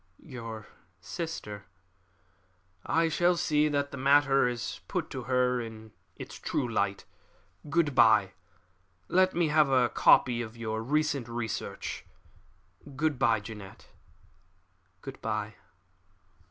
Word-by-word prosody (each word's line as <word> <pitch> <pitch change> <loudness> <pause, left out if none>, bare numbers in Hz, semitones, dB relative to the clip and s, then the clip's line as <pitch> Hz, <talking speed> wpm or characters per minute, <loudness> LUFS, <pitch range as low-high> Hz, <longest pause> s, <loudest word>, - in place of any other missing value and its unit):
"Your 115 -6 -8 0.3
sister 105 - -6 0.6
" 90 0 -39 0.2
"I - - +3
shall 175 +2 +2
see 150 -1 +2
that 145 -1 -1
the 140 - -7
matter 140 -1 +4
is 120 -2 -4
put - - -3
to - - -6
her 125 -1 +1
in 110 -1 -9 0.2
its - - -9
true 125 - -2
light. 100 -3 -1 0.6
Good 155 -2 +1
bye! 110 -5 +5 0.8
Let 185 +1 +3
me 170 -2 +2
have 150 -1 +4
a 130 -2 +3
copy 120 -2 +4
of 115 0 -8
your 110 -1 -3
recent 145 0 0
research. 115 -2 -4 0.9
Good 150 -1 0
bye, 115 -5 +3
Jeannette!" 105 -3 -11 1.1
"Good - - -9
bye!" 110 -1 -3
125 Hz, 120 wpm, -29 LUFS, 110-145 Hz, 1.1 s, bye